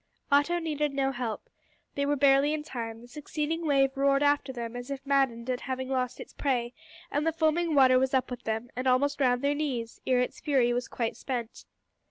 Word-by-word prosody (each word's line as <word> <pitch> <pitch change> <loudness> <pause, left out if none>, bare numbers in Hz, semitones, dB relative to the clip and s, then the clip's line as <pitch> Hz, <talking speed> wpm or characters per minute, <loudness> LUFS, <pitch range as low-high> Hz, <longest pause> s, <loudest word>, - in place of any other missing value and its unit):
Otto 290 +5 +4
needed 300 -4 -2
no 270 -1 +1
help. 240 -4 -4 0.5
They 280 0 -1
were 290 - +2
barely 280 +2 +4
in 300 - -5
time. 230 -5 -6
The 240 - -13
succeeding 305 +4 -3
wave 270 -1 +3
roared 275 +1 +3
after 290 -2 +2
them 235 -2 -6
as 245 +2 -7
if 275 0 -5
maddened 265 -4 +1
at 255 -1 -2
having 260 -1 -4
lost 255 -2 -1
its - - -10
prey, 245 -4 -1 0.4
and 290 - 0
the 325 - +2
foaming 320 0 +1
water 260 -2 +6
was 265 +1 +1
up 260 -1 0
with 245 - -5
them, 225 +2 -3
and 255 +1 -2
almost 280 +3 +2
round 250 0 +2
their 285 +1 +2
knees, 260 -6 -3
ere 255 -1 +3
its 250 - -2
fury 260 -6 +2
was 245 +1 -2
quite 230 -2 -3
spent. 240 -4 -5
270 Hz, 210 wpm, -28 LUFS, 245-290 Hz, 0.5 s, water